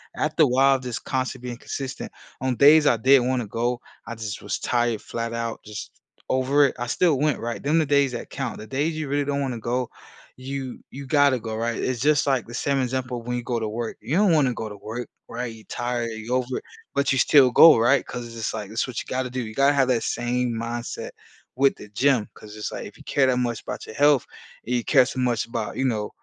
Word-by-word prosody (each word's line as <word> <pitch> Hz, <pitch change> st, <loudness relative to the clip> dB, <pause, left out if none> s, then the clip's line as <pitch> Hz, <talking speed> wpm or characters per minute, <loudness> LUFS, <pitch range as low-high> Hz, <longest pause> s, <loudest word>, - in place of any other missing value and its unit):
after 155 Hz, +1 st, +2 dB
a 145 Hz, -, +5 dB
while, 135 Hz, +2 st, +4 dB
just 125 Hz, -3 st, -6 dB
constantly 130 Hz, -1 st, -2 dB
being 120 Hz, -, -6 dB
consistent. 135 Hz, +1 st, -6 dB, 0.3 s
On 130 Hz, -1 st, 0 dB
days 150 Hz, +5 st, +7 dB
I 120 Hz, -, +4 dB
didn't 130 Hz, +1 st, +5 dB
wanna 125 Hz, -4 st, -1 dB
go, 120 Hz, +3 st, -1 dB, 0.3 s
I -, -, -6 dB
just 110 Hz, -3 st, -6 dB
was -, -, -3 dB
tired, 120 Hz, -3 st, 0 dB
flat 115 Hz, 0 st, -4 dB
out, 115 Hz, -1 st, -3 dB
just 105 Hz, -1 st, -7 dB, 0.4 s
over 135 Hz, +3 st, +3 dB
it. -, -, -6 dB
I 120 Hz, -, -3 dB
still 165 Hz, +2 st, +2 dB
went, 150 Hz, -2 st, +1 dB
right? 115 Hz, 0 st, -4 dB
Them 150 Hz, +4 st, +3 dB
the 160 Hz, -, +2 dB
days 140 Hz, -2 st, +3 dB
that 120 Hz, -, -6 dB
count. 130 Hz, -6 st, -4 dB
The 110 Hz, -, -9 dB
days 145 Hz, +6 st, -1 dB
you 155 Hz, -2 st, -3 dB
really 145 Hz, 0 st, 0 dB
don't 140 Hz, 0 st, -1 dB
wanna 130 Hz, -4 st, -3 dB
go, 120 Hz, +2 st, -2 dB, 0.5 s
you 130 Hz, 0 st, -5 dB
you 140 Hz, 0 st, -8 dB
gotta 140 Hz, -2 st, +4 dB
go, 110 Hz, -1 st, -5 dB
right? 115 Hz, +1 st, -2 dB
It's 130 Hz, -2 st, -1 dB
just, 145 Hz, +1 st, +3 dB
like, 135 Hz, -4 st, +1 dB
the 120 Hz, -, -11 dB
same 140 Hz, +3 st, 0 dB
example 125 Hz, -2 st, -2 dB
when 125 Hz, +1 st, -3 dB
you -, -, -3 dB
go 120 Hz, -1 st, -1 dB
to 110 Hz, -, -2 dB
work. 115 Hz, +1 st, -4 dB
You 130 Hz, +10 st, -1 dB
don't 200 Hz, -4 st, +4 dB
wanna 135 Hz, -5 st, +3 dB
go 110 Hz, -2 st, -5 dB
to 105 Hz, -, -9 dB
work, 115 Hz, +4 st, -6 dB, 0.2 s
right? 120 Hz, 0 st, -4 dB
You're 110 Hz, -1 st, -15 dB
tired. 120 Hz, -1 st, -2 dB
You're 110 Hz, +3 st, -3 dB
over 130 Hz, 0 st, -1 dB
it, -, -, -22 dB, 0.3 s
but 140 Hz, -1 st, +1 dB
you 135 Hz, -, +2 dB
still 130 Hz, 0 st, +6 dB
go, 160 Hz, +5 st, +9 dB
right? 120 Hz, +5 st, +3 dB
‘Cause 120 Hz, -1 st, -6 dB
it's 115 Hz, -, -11 dB
just 110 Hz, -1 st, -3 dB
like 105 Hz, -2 st, -5 dB
that's 115 Hz, +2 st, -1 dB
what 125 Hz, -, -4 dB
you -, -, -12 dB
gotta 130 Hz, -1 st, -2 dB
do. 130 Hz, 0 st, -2 dB
You 110 Hz, -2 st, -7 dB
gotta 140 Hz, +1 st, +4 dB
have 135 Hz, -2 st, +3 dB
that 120 Hz, -3 st, +2 dB
same 120 Hz, +1 st, -1 dB
mindset 115 Hz, +1 st, -4 dB, 0.5 s
with 135 Hz, +2 st, +3 dB
the 105 Hz, -, -11 dB
gym. 125 Hz, +1 st, +2 dB
'Cause 105 Hz, 0 st, -12 dB
it's, 105 Hz, -, -4 dB
like, -, -, -6 dB
if -, -, -14 dB
you -, -, -14 dB
care 135 Hz, -2 st, +2 dB
that 125 Hz, -1 st, +2 dB
much 120 Hz, -2 st, -1 dB
about -, -, -6 dB
your -, -, -9 dB
health, 145 Hz, -2 st, +4 dB, 0.4 s
and 125 Hz, -, -2 dB
you 120 Hz, -, 0 dB
care 125 Hz, -, +5 dB
so 130 Hz, -, -5 dB
much 120 Hz, -2 st, +1 dB
about, 115 Hz, -2 st, -4 dB
you 135 Hz, -, 0 dB
know, 110 Hz, -4 st, -1 dB
125 Hz, 245 wpm, -24 LUFS, 115-135 Hz, 0.5 s, go